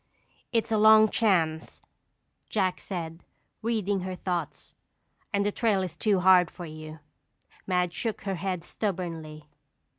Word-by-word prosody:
"It's 230 -2 0
a 220 - +2
long 215 0 +7
chance," 165 -9 +1 0.7
Jack 185 -4 0
said, 165 -3 -6 0.4
reading 215 -4 0
her 185 0 -4
thoughts, 180 -1 -4 0.6
"and 200 -2 +1
the 205 - +1
trail 205 -4 +1
is 175 -3 -5
too 195 +1 +1
hard 180 -1 +6
for 175 - -9
you." 155 0 -9 0.7
Madge 180 -2 +1
shook 225 +1 -3
her 195 -1 -3
head 180 -1 -3
stubbornly. 165 -7 -4
185 Hz, 130 wpm, -27 LUFS, 170-205 Hz, 0.7 s, long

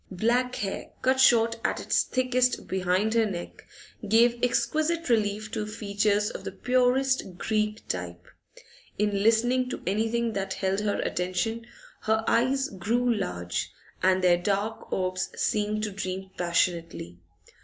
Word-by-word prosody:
Black 240 +6 0
hair, 195 -1 -4
cut 260 0 +2
short 230 -3 +5
at - - 0
its - - +2
thickest 255 -1 +1
behind 190 +3 0
her 225 -1 +3
neck, 175 -3 -7 0.4
gave 235 +2 +4
exquisite 305 +7 0
relief 215 -2 0
to 210 -1 -3
features 210 -1 0
of - - -8
the - - -5
purest 255 -5 +1
Greek 215 +1 -1
type. 90 -1 -5 0.7
In 205 -1 0
listening 240 +4 +3
to - - -6
anything 225 +4 0
that 195 -1 -3
held 190 0 0
her 210 -1 -1
attention 220 +6 -2 0.3
her 220 +1 0
eyes 265 +3 +2
grew 235 +6 0
large, 90 - -3 0.3
and 185 +1 +3
their 175 -1 +5
dark 200 +4 -2
orbs 185 0 -1
seemed 215 0 0
to 215 - -2
dream 190 -1 -5
passionately. 170 - -1
215 Hz, 135 wpm, -27 LUFS, 190-235 Hz, 0.7 s, short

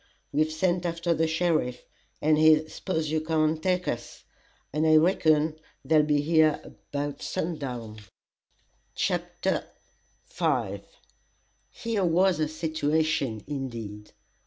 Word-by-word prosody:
We've 155 +2 +1
sent 175 +2 0
after 170 0 0
the 160 0 +1
sheriff, 160 -6 0 0.4
and 155 +1 +5
his 155 0 +4
'spose 160 -4 -2
you 155 0 +1
come 160 0 +1
and 155 0 0
take 180 +1 0
us,' 120 0 -5 0.5
and 155 +2 +1
I 155 - +6
reckon 155 -2 +3 0.3
they'll 155 -1 +5
be 150 -1 +2
here 155 0 +3
about 145 0 -6
sun 165 -1 -3
down." 120 -6 -6 1.0
CHAPTER 175 +1 -1 0.6
V - - -1 0.9
Here 225 -4 -2
was 180 +1 +3
a 155 - +1
"situation" 155 -6 -1
indeed. 115 -7 -6
155 Hz, 120 wpm, -27 LUFS, 145-165 Hz, 1.0 s, I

